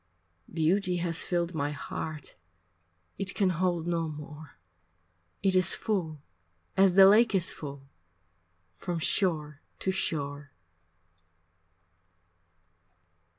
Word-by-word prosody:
Beauty 180 +3 +1
has 170 0 0
filled 175 0 -1
my 145 -2 -1
heart, 150 +1 -6 0.9
It 195 -1 -3
can 190 -2 +2
hold 175 -1 0
no 170 -1 -1
more, 150 0 -10 0.9
It 190 -1 +2
is 185 -1 +4
full, 160 -9 -3 0.5
as 190 -2 +4
the 195 0 +9
lake 215 +2 +5
is 180 -3 +1
full, 140 -2 -9 0.9
From 175 - -3
shore 155 -4 -1 0.2
to 190 - -1
shore. 145 -6 -3
170 Hz, 100 wpm, -29 LUFS, 150-185 Hz, 0.9 s, the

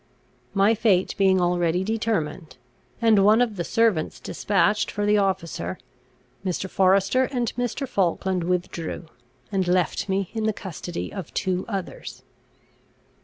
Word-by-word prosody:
My 200 +3 +4
fate 200 -5 +2
being 190 -1 +4
already 175 0 +1
determined, 190 -7 -2 0.5
and 215 -4 +5
one 215 +3 +6
of 240 -4 +1
the 175 - -2
servants 215 -6 +1
despatched 210 +1 +1
for 205 -1 -2
the 210 0 +4
officer, 170 - -2 0.7
Mr. 190 0 -2
Forester 195 +7 +3
and 245 -3 -2
Mr. 245 +3 -2
Falkland 190 -4 0
withdrew, 175 -1 -3 0.5
and 190 -3 0
left 180 +2 +1
me 190 -1 -1
in 220 -1 -2
the 220 - +1
custody 175 -3 -6
of 190 -6 -6
two 185 0 -1
others. 190 - -6
190 Hz, 130 wpm, -24 LUFS, 180-215 Hz, 0.7 s, one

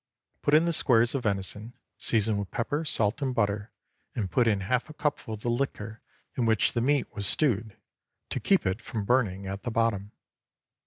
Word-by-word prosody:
Put 145 - +3
in 160 +2 +5
the 170 - +1
squares 120 -6 +3
of 135 - -1
venison, 105 +3 -1 0.3
season 110 -2 +3
with 100 -2 -4
pepper, 145 +7 -2
salt, 110 -5 +2
and 130 -2 -1
butter, 105 -1 -1 0.4
and 100 -5 -3
put 125 -2 +2
in 105 -3 +2
half 125 +8 -1
a 155 - -11
cupful 145 -7 -2
of 105 - -13
the 120 - -2
liquor 115 -3 -3 0.3
in 120 -3 0
which 110 -2 +2
the 120 - 0
meat 140 +3 +1
was 100 -3 -2
stewed, 110 -5 0 0.5
to - - -1
keep 195 - +2
it 95 +4 -1
from 110 -3 -5
burning 100 -6 +1
at 95 +1 -5
the 120 - -4
bottom. 110 -3 0
115 Hz, 195 wpm, -27 LUFS, 105-130 Hz, 0.5 s, in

